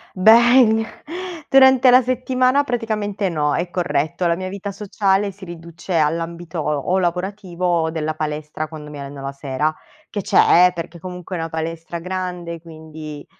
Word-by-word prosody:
Beh, 225 +2 +6 0.6
durante 265 -1 +6
la 250 +1 +7
settimana 255 +2 +1
praticamente 215 -6 -2
no, 150 -3 0
è 175 +1 -2
corretto. 170 0 -1
La 170 - +2
mia 185 +2 -5
vita 200 +1 -5
sociale 200 0 0
si 195 +1 -16
riduce 170 0 -5
all'ambito 165 +2 -2
o 150 +5 0
lavorativo 185 0 -3
o 170 -2 +2
della 155 -1 -2
palestra 155 0 -4
quando 150 -1 -10
mi 145 - -8
alleno 140 0 -8
la 135 0 -4
sera, 140 +2 -2 0.4
che 205 - -3
c'è, 180 -1 +5
eh, - - -1
perché 170 0 -7
comunque 180 +1 -7
è - - -3
una 165 0 -3
palestra 165 +1 -5
grande 180 -1 -5
quindi, 155 -2 -10
175 Hz, 155 wpm, -20 LUFS, 160-200 Hz, 0.6 s, la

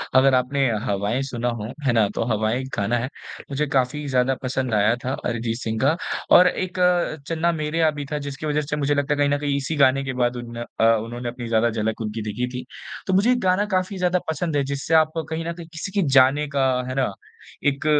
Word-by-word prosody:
अगर 135 +1 +6
आपने 135 +2 +1 0.2
हवाएँ 105 +3 0
सुना 120 -2 -2
हो, 105 +3 -5 0.2
है - - +5
ना? 110 -3 +4
तो - - 0
हवाएँ 110 +3 0
एक 130 - -7
गाना 105 +4 +1
है। 120 +2 -2 0.4
मुझे 145 +2 0
काफ़ी 135 +4 0
ज़्यादा 130 0 +2
पसंद 130 -1 -1
आया 105 +2 +3
था 130 - -1
अरिजीत 115 -1 -2
सिंह 110 -1 -2
का 145 +4 +3 0.4
और 180 - +7
एक 185 0 -2
अ, 180 -3 +2
चन्ना 165 +1 +1
मेरेया 160 0 +1
भी 145 - -4
था 150 - 0
जिसकी 140 +2 -6
वज़ह 150 0 +1
से 150 0 -3
मुझे 145 -1 +1
लगता 145 +1 +1
है 145 - -2
कहीं 145 0 +2
न 145 - +2
कहीं 145 -1 -1
इसी 140 +3 -2
गाने 135 -1 +4
के 135 - -3
बाद 120 0 +1
उन 120 -1 -7 0.2
अ, - - +3
उन्होंने 120 +2 -4
अपनी 120 0 -7
ज़्यादा 115 0 +2
झलक 110 0 -2
उनकी 110 0 -3
दिखी 110 +4 -3
थी। 125 0 -5 0.4
तो 190 - +1
मुझे 205 +7 +4
एक 250 - +2
गाना 185 +2 +2
काफ़ी 185 +2 -1
ज़्यादा 180 0 +1
पसंद 160 0 -2
है 140 - +2
जिससे 140 +3 -3
आप 155 -1 +4 0.2
कहीं 160 +1 -3
न 170 - -2
कहीं 170 -1 -10
किसी 165 +4 -5
की 200 0 +1
जाने 135 +2 +4
का, 135 -2 +1 0.2
है 130 - -4
ना? 130 -6 0 0.5
एक 140 0 0
135 Hz, 235 wpm, -23 LUFS, 120-155 Hz, 0.5 s, और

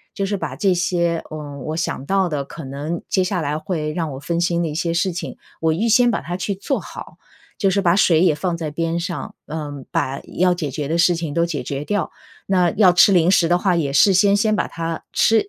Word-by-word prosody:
就 200 -2 -1
是 205 +1 -1
把 155 -8 -4
这 190 +2 +2
些， 170 -2 0
呃， 150 -2 -7
我 155 +4 -4
想 165 -5 -2
到 195 -1 +2
的 150 -4 -2
可 155 +2 -9
能 145 +5 -5
接 185 - +1
下 185 0 -1
来 150 -2 -2
会 155 -3 -3
让 165 -2 -2
我 130 - -7
分 170 +4 -2
心 175 0 +1
的 165 - -1
一 150 - -4
些 170 +1 -1
事 180 +2 +1
情， 170 - -6 0.2
我 160 -1 +2
预 215 +8 0
先 245 +2 +5
把 235 - -1
它 175 +5 -5
去 190 +2 -2
做 270 +8 -2
好。 - - -10 0.4
就 195 -2 +2
是 200 +1 +1
把 175 -2 +3
水 170 -5 +4
也 175 -4 +4
放 170 +3 -2
在 160 -2 -4
边 165 +2 -2
上， 175 0 -5
呃， 145 -3 -6
把 135 +1 -1 0.2
要 180 0 +4
解 170 -5 -3
决 140 +1 -4
的 160 - -1
事 175 +1 +4
情 165 -3 -4
都 170 +2 +2
解 155 -6 -2
决 140 +3 -4
掉， 205 0 -2 0.3
那 180 -2 +2
要 185 -4 +6
吃 180 +3 +6
零 175 0 +4
食 170 -3 +4
的 175 +1 +3
话 180 0 +1
也 150 -5 0
事 170 +8 +5
先 200 +2 +4
先 215 0 +2
把 - - 0
它 165 0 -5
吃 225 0 +3
170 Hz, 265 characters per minute, -20 LUFS, 155-185 Hz, 0.4 s, 要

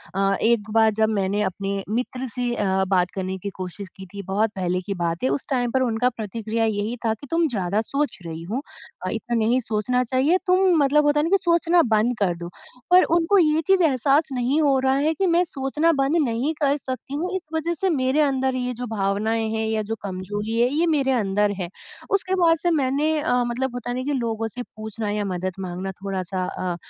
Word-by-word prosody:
अ, 195 0 +2
एक 225 -2 +2
बार 220 -1 +5
जब 220 0 +2
मैंने 200 +1 0
अपने 195 +1 -3
मित्र 255 +1 -3
से 245 +1 -2
अ, 190 -1 +1
बात 180 -2 +2
करने 190 0 -3
की 200 +2 -4
कोशिश 185 +1 -6
की 190 - -9
थी 200 - -5
बहुत 205 +3 +1
पहले 180 -1 -1
की 200 +2 -4
बात 170 0 -1
है। 130 - +2
उस 140 +1 -2
टाइम 245 -3 0
पे 260 - +2
उनका 240 +1 +1
प्रतिक्रिया 225 0 -3
यही 215 +1 -1
था 220 - +2
कि 280 +6 -11
तुम 330 0 +3
ज़्यादा 205 - -1
सोच 280 +5 -2
रही 165 0 -6
हो। 225 +10 -3 0.4
अ, - - -1
इतना 240 - -3
नहीं 230 +3 +2
सोचना 230 +3 0
चाहिए। 265 +8 +2
तुम 365 0 +4
मतलब 295 +2 +3
होता 295 0 +3
है 295 - +2
ना - - -1
कि 395 - +6
सोचना 340 -1 +3
बंद 220 +3 +3
कर 185 -4 +1
दो। 170 0 -7 0.4
पर 365 +1 +8
उनको 345 +4 +3
ये 315 -2 +4
चीज़ 385 -2 +4
एहसास 285 +1 +3
नहीं 260 +5 +1
हो 280 -3 +3
रहा 265 0 +3
है 295 +3 +2
कि 380 +4 0
मैं 355 - +4
सोचना 300 +2 0
बंद 280 +5 +2
नहीं 240 +7 -1
कर 280 0 +3
सकती 260 -1 -6
हूँ 340 +5 -2
इस 375 - -2
वजह 335 +2 0
से 385 - +2
मेरे 260 +4 +2
अंदर 265 -2 +1
ये 250 -1 -2
जो 245 - -3
भावनाएँ 215 +3 0
हैं 220 0 -1
या 220 0 0
जो 225 - 0
कमज़ोरी 205 +4 -3
है 245 - +4
ये 335 +3 +2
मेरे 270 -1 +1
अंदर 205 0 +1
है। 175 - -3 0.5
उसके 380 -1 -2
बाद 330 -1 +5
से 350 - +2
मैंने 295 +4 +1
अ, 245 -2 +1
मतलब 250 +1 -2
होता 245 0 -5
है 245 - -2
ना 255 - -2
कि - - 0
लोगों 225 -3 -1
से 245 - -3
पूछना 215 -1 -6
या 210 0 -1
मदद 185 +1 -3
माँगना 185 +1 -4
थोड़ा-सा 190 -1 -3
अ, 180 -1 -3
235 Hz, 225 wpm, -23 LUFS, 200-280 Hz, 0.5 s, पर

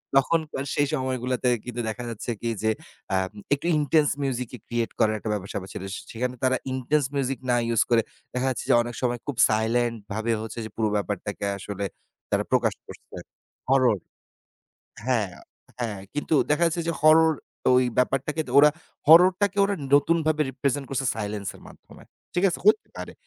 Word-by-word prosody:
তখনকার 150 0 +1
সেই 145 -1 +2
সময়গুলাতে 130 -1 -1 0.2
কিন্তু 120 -1 -4
দেখা 120 +3 -5
যাচ্ছে 115 +1 -4
কি 115 - -1
যে, 110 - +3 0.4
আম 95 0 0 0.2
একটু 145 +4 -2
intense 150 0 +3
music 125 -3 -2
ই - - -11
create 120 -1 -2
করার 110 0 +3
একটা 110 - -5
ব্যাপার-স্যাপার 95 -1 -5
ছিল। - - -6 0.3
সেখানে 125 +2 -3
তারা 130 0 +3
intense 130 +2 +1
music 135 -1 -1
না 120 - +4
ইউস 115 -2 +2
করে 115 -1 +4 0.3
দেখা 125 +1 0
যাচ্ছে 130 - -3
যে, - - +6
অনেক 120 0 -5
সময় 120 -1 0
খুব 145 - -3
সাইলেন্ট 115 +2 +1 0.2
ভাবে 110 +2 -1
হচ্ছে 110 +1 -6
যে - - -7
পুরো 110 -1 +1
ব্যাপারটাকে 105 0 -3
আসলে 100 0 -5 0.5
তারা - - +2
প্রকাশ - - +3
করছে। - - -13 0.5
হরর 130 -5 +4 1.1
হ্যাঁ, 115 -7 +1 0.5
হ্যাঁ 110 -5 -3
কিন্তু 150 +1 -1 0.2
দেখা 150 +3 +2
যাচ্ছে 170 +1 -1
যে - - +2
হরর 160 +1 +6 0.4
ওই 130 - +4
ব্যাপারটাকে 135 +5 +1 0.2
ওরা, 150 +1 +8 0.4
হররটাকে 185 +5 +6
ওরা 200 0 0 0.2
নতুনভাবে 155 +1 +3
রিপ্রেজেন্ট 140 +1 -2
করছে 135 0 -1
সাইলেন্স 105 -3 -4
এর - - -18
মাধ্যমে, - - -16 0.3
ঠিক 180 - +1
আছে? - - -3
হইতে 430 0 +4
পারে, - - -7
125 Hz, 165 wpm, -25 LUFS, 115-145 Hz, 1.1 s, ওরা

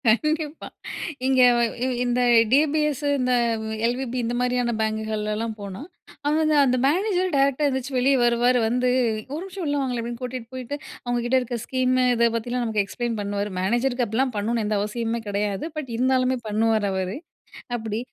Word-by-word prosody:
கண்டிப்பா! 305 +6 +1 0.6
இங்க 260 -1 +4 0.4
இ - - +1 0.2
இந்த 245 0 +1 0.3
டி 270 - +7
பி 310 - +2
எஸ் 290 -2 -4 0.2
இந்த 255 0 +1 0.5
எல்.வி.பி 250 +1 -1
இந்த 240 +1 -2
மாதிரியான 245 -1 +1
பேங்குகள்லாம் 220 0 -2
போனா, 200 -1 -7 0.4
அவங்க 295 +2 +2
வந்து 310 -1 +3
அந்த 255 -1 +2
மேனேஜர் 370 +3 +1
டைரக்ட்டா 275 +1 +3
எந்திரிச்சு 265 0 -2
வெளியே 265 +2 +3
வருவாரு, 240 +1 +3
வந்து, 250 +2 +1 0.4
"ஒரு 310 - -3
நிமிஷம் 385 -2 -6
உள்ள 290 -1 0
வாங்களேன்" 250 -3 -2
அப்படின்னு 235 +1 -6
கூட்டிட்டு 250 -1 -6
போயிட்டு, 255 +3 -5 0.3
அவங்க 245 0 0
கிட்ட 255 +2 +3
இருக்க 245 -1 -4
ஸ்கீம் 255 -1 +1 0.2
இத 235 0 +3
பத்திலாம் 240 +2 -2
நமக்கு 215 -3 +1
எக்ஸ்ப்ளைன் 235 +2 -3
பண்ணுவாரு. 200 0 -2
மேனேஜருக்கு 240 +5 +1
அப்படிலாம் 245 +3 0
பண்ணணும்னு 220 +2 0
எந்த 210 0 +1
அவசியமுமே 230 +2 -2
கெடையாது. 200 +3 -1
பட், 295 -4 -4
இருந்தாலுமே 255 +1 +2
பண்ணுவாரு 215 0 +2
அவரு. 190 +2 -2 0.6
அப்படி, 220 -2 -4
245 Hz, 160 wpm, -24 LUFS, 220-265 Hz, 0.6 s, டி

